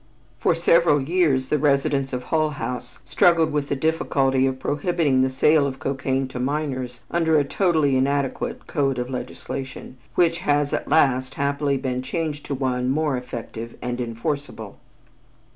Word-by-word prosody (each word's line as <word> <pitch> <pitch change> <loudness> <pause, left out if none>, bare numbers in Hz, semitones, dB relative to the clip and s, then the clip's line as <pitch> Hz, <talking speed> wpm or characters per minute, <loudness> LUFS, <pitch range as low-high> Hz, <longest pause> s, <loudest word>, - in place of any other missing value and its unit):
For - - +2
several 170 -3 +4
years 140 -3 +1
the 150 - +2
residents 140 -1 +1
of 125 -1 -3
Hull 155 +1 +1
House 125 -4 -5
struggled 165 -2 +3
with 145 -1 -1
the - - +1
difficulty 135 -3 +1
of 130 0 -2
prohibiting 145 -1 +1
the 130 - +2
sale 140 +2 +3
of 135 -1 -5
cocaine 135 0 -1
to 125 - -6
minors 130 -3 -3
under 160 -2 +3
a 145 - +4
totally 155 -3 +1
inadequate 140 +1 -1
code 135 -3 0
of 125 +1 -3
legislation, 130 0 -6 0.2
which 170 -1 +3
has 145 -3 +1
at - - -2
last 130 -4 +2
happily 140 0 0
been 130 -1 -2
changed 150 +2 -4
to 140 - -2
one 125 -1 -1
more 150 0 +1
effective 115 -2 -7
and 125 0 -3
enforcible. 115 -2 -4
140 Hz, 155 wpm, -23 LUFS, 130-150 Hz, 0.2 s, several